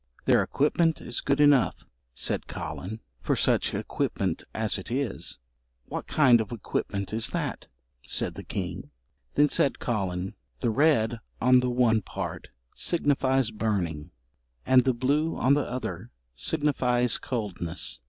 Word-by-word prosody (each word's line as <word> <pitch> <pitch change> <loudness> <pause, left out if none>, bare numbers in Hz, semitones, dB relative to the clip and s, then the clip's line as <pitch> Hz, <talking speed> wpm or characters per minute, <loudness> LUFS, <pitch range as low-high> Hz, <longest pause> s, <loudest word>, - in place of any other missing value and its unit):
"Their - - +5
equipment 160 +3 +1
is 120 - -3
good 140 0 +1
enough," 145 -4 +4 0.3
said - - -1
Collen, 110 +5 -6 0.2
"for - - 0
such - - +2
equipment - - -2
as 110 -2 -1
it 95 - -9
is." 130 +1 -1 0.5
"What - - -5
kind 125 -6 +5
of 110 - -6
equipment 100 -3 -3
is 115 +3 +1
that?" 150 -5 -3 0.3
said - - -1
the - - -8
king. - - -5 0.5
Then 150 - +5
said 140 - +2
Collen, 95 -5 -2 0.3
"The 115 - +1
red 120 -4 +3 0.2
on 125 0 +5
the 125 0 0
one 120 -3 +3
part - - -6 0.3
signifies 135 -6 +1
burning, 90 -8 -2 0.6
and 130 -1 +5
the 130 -2 +2
blue 145 +6 +1
on 130 +3 +4
the 145 0 +1
other 125 +1 -5 0.2
signifies 125 - +1
coldness." 90 - -2
125 Hz, 135 wpm, -27 LUFS, 110-140 Hz, 0.6 s, Their